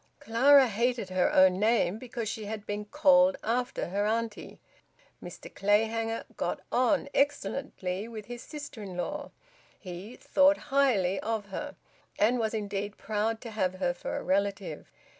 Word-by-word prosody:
Clara 265 Hz, +4 st, +5 dB
hated 235 Hz, -1 st, -1 dB
her 185 Hz, -1 st, +2 dB
own 185 Hz, 0 st, +5 dB
name 215 Hz, -2 st, +2 dB
because 240 Hz, -2 st, -5 dB
she 215 Hz, 0 st, -4 dB
had 210 Hz, 0 st, -6 dB
been 205 Hz, 0 st, -4 dB
`called 280 Hz, +2 st, +4 dB
after' 245 Hz, -3 st, -1 dB
her 200 Hz, +3 st, 0 dB
auntie. 225 Hz, -1 st, -3 dB, 0.6 s
Mr -, -, -9 dB
Clayhanger 225 Hz, +3 st, +1 dB
`got -, -, -2 dB
on' 265 Hz, +3 st, +2 dB
excellently 275 Hz, -8 st, -1 dB
with 220 Hz, -3 st, -8 dB
his 240 Hz, +1 st, -8 dB
sister 290 Hz, -7 st, -8 dB
in 190 Hz, -3 st, -7 dB
law. 290 Hz, +11 st, -4 dB, 0.5 s
He 190 Hz, +5 st, -8 dB
`thought 290 Hz, +1 st, +4 dB, 0.2 s
highly' 200 Hz, -10 st, +3 dB
of 215 Hz, -2 st, -3 dB
her, 290 Hz, +9 st, -5 dB, 0.4 s
and 240 Hz, +4 st, +3 dB
was 220 Hz, 0 st, -1 dB
indeed 205 Hz, -1 st, -3 dB
proud 220 Hz, +1 st, -2 dB
to 230 Hz, -, -7 dB
have 185 Hz, -4 st, -1 dB
her 180 Hz, -2 st, 0 dB
for 175 Hz, -, -5 dB
a -, -, -5 dB
relative. 195 Hz, -4 st, -1 dB
220 Hz, 150 wpm, -29 LUFS, 200-250 Hz, 0.6 s, Clara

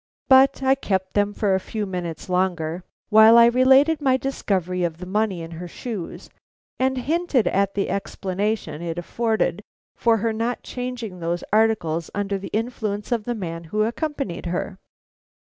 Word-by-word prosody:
But 265 Hz, +1 st, +5 dB
I 265 Hz, 0 st, +5 dB
kept 190 Hz, -8 st, -2 dB
them 205 Hz, 0 st, +2 dB
for 205 Hz, -1 st, 0 dB
a 190 Hz, -, +2 dB
few 215 Hz, +2 st, -4 dB
minutes 180 Hz, -4 st, -5 dB
longer 180 Hz, -2 st, -1 dB, 0.3 s
while 220 Hz, +1 st, +8 dB
I 235 Hz, -, +9 dB
related 265 Hz, +6 st, +4 dB
my 260 Hz, -2 st, +3 dB
discovery 185 Hz, -9 st, -2 dB
of 165 Hz, -2 st, -2 dB
the 180 Hz, -, -8 dB
money 195 Hz, -2 st, -1 dB
in 165 Hz, -, -9 dB
her 170 Hz, +2 st, -7 dB
shoes, 200 Hz, -1 st, -7 dB, 0.5 s
and 260 Hz, 0 st, +1 dB
hinted 285 Hz, -1 st, +1 dB
at 195 Hz, 0 st, +1 dB
the 200 Hz, -, 0 dB
explanation 195 Hz, -1 st, -3 dB
it 170 Hz, -1 st, -4 dB
afforded 215 Hz, -1 st, -1 dB, 0.3 s
for 230 Hz, -1 st, +3 dB
her 225 Hz, +1 st, -1 dB
not 230 Hz, +3 st, -2 dB
changing 245 Hz, -7 st, -5 dB
those 170 Hz, +1 st, -2 dB
articles 210 Hz, -7 st, +1 dB
under 200 Hz, -1 st, -1 dB
the 195 Hz, -, -7 dB
influence 215 Hz, -1 st, -3 dB
of 230 Hz, -3 st, 0 dB
the 240 Hz, -, -2 dB
man 170 Hz, -5 st, -5 dB
who 210 Hz, +6 st, 0 dB
accompanied 240 Hz, -, -3 dB
her. 185 Hz, +2 st, -3 dB
205 Hz, 160 wpm, -23 LUFS, 180-240 Hz, 0.5 s, I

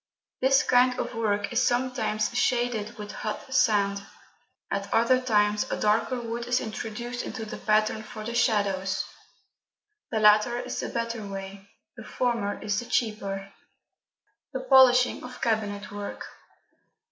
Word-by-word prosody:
This 270 Hz, +2 st, +4 dB
kind 250 Hz, 0 st, +4 dB
of -, -, -3 dB
work 205 Hz, -2 st, -1 dB
is 240 Hz, -, +2 dB
sometimes 240 Hz, -3 st, 0 dB
shaded 240 Hz, -3 st, 0 dB
with 210 Hz, -1 st, -7 dB
hot 240 Hz, +5 st, -5 dB
sand; 200 Hz, -5 st, +2 dB, 0.7 s
at 200 Hz, 0 st, -3 dB
other 255 Hz, +3 st, +3 dB
times 210 Hz, -4 st, +2 dB
a -, -, -2 dB
darker 220 Hz, +4 st, +1 dB
wood 235 Hz, 0 st, -5 dB
is 245 Hz, +1 st, +2 dB
introduced 235 Hz, +2 st, -5 dB
into 225 Hz, -3 st, -6 dB
the 215 Hz, -, -7 dB
pattern 215 Hz, 0 st, +1 dB
for 215 Hz, 0 st, -9 dB
the 230 Hz, +2 st, -5 dB
shadows. 200 Hz, -5 st, +1 dB, 1.0 s
The 220 Hz, -, -1 dB
latter 215 Hz, +3 st, +5 dB
is -, -, -4 dB
the -, -, -3 dB
better 230 Hz, -1 st, -3 dB
way; 195 Hz, 0 st, -8 dB, 0.3 s
the 225 Hz, -, -10 dB
former 230 Hz, -3 st, -1 dB
is 205 Hz, -1 st, 0 dB
the 240 Hz, -, -6 dB
cheaper. 200 Hz, -4 st, -2 dB, 1.0 s
The 260 Hz, -, -3 dB
polishing 255 Hz, -1 st, +5 dB
of 250 Hz, 0 st, -9 dB
cabinet 210 Hz, -2 st, -1 dB
work. 205 Hz, 0 st, -6 dB
220 Hz, 140 wpm, -27 LUFS, 205-245 Hz, 1.0 s, latter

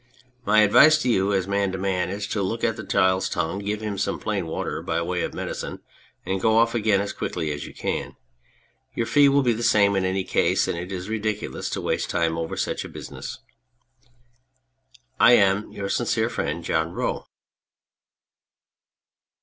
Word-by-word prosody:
My 110 Hz, 0 st, +5 dB
advice 155 Hz, +9 st, +6 dB
to 125 Hz, -, 0 dB
you 100 Hz, -3 st, +2 dB
as 95 Hz, -2 st, 0 dB
man 100 Hz, -1 st, 0 dB
to -, -, -2 dB
man 95 Hz, -1 st, -1 dB
is, 100 Hz, +2 st, -4 dB
to 105 Hz, -, -1 dB
look 105 Hz, +5 st, -2 dB
at 115 Hz, -, +1 dB
the 110 Hz, -, -7 dB
child's 95 Hz, -1 st, +2 dB
tongue, 85 Hz, +3 st, -2 dB
give 105 Hz, +1 st, -3 dB
him 105 Hz, -2 st, -4 dB
some -, -, -1 dB
plain 100 Hz, -5 st, -3 dB
water 80 Hz, -, -3 dB
by 80 Hz, -, -1 dB
way 90 Hz, +1 st, -2 dB
of -, -, -4 dB
medicine, -, -, -5 dB, 0.5 s
and 95 Hz, 0 st, -2 dB
go 110 Hz, +1 st, +3 dB
off 115 Hz, 0 st, +3 dB
again 110 Hz, -4 st, +2 dB
as 100 Hz, +1 st, -3 dB
quick -, -, -5 dB
as 75 Hz, -3 st, -3 dB
you -, -, -11 dB
can. -, -, -3 dB, 0.8 s
Your 115 Hz, -, 0 dB
fee 140 Hz, +4 st, +5 dB
will 140 Hz, 0 st, +3 dB
be 120 Hz, -2 st, +3 dB
the 115 Hz, -, -5 dB
same 100 Hz, -3 st, +4 dB
in 95 Hz, -, +1 dB
any 95 Hz, +1 st, 0 dB
case, -, -, +1 dB
and -, -, -1 dB
it 90 Hz, +3 st, -6 dB
is 90 Hz, 0 st, -5 dB
ridiculous 110 Hz, -1 st, -3 dB
to -, -, -3 dB
waste -, -, -1 dB
time 80 Hz, -1 st, 0 dB
over 80 Hz, 0 st, -4 dB
such -, -, -3 dB
business. -, -, -8 dB, 1.8 s
I 120 Hz, -, +7 dB
am, 100 Hz, -2 st, +3 dB
Your 100 Hz, -1 st, -5 dB
sincere 115 Hz, +1 st, 0 dB
friend, 85 Hz, -6 st, -3 dB
JOHN 80 Hz, +1 st, -1 dB
ROE. -, -, -3 dB
100 Hz, 180 wpm, -24 LUFS, 95-110 Hz, 1.8 s, I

